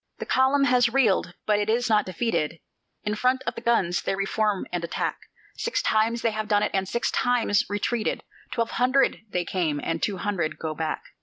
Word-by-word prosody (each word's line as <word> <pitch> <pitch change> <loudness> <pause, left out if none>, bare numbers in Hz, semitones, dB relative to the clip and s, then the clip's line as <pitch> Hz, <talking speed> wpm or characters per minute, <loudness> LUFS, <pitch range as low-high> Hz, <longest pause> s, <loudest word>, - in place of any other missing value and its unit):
The - - -5
column 265 +2 +3
has 250 -2 +4
reeled, 225 -8 +2
but 210 -1 +2
it 210 +1 -1
is 240 +2 +2
not 215 -3 +2
defeated; 180 -5 -1 0.4
In 210 - -1
front 255 +4 +1
of - - -1
the - - -8
guns 195 -7 +1
they - - -1
re 195 0 -1
form 210 -1 0
and 175 -1 -2
attack; 170 - -2 0.4
Six 465 - -1
times 225 +2 +1
they 230 - +2
have 215 0 -3
done 205 -1 +3
it, - - 0
and 190 -1 0
six 235 - 0
times 240 -5 +2
retreated; 215 +2 -1 0.3
Twelve 230 -1 -1
hundred 255 +2 +2
they 180 -2 -1
came, 165 -5 -1
and 165 0 -2
two 200 -3 -1
hundred 180 -4 -2
go 160 -1 -3
back. 155 0 -3
210 Hz, 205 wpm, -25 LUFS, 185-240 Hz, 0.4 s, has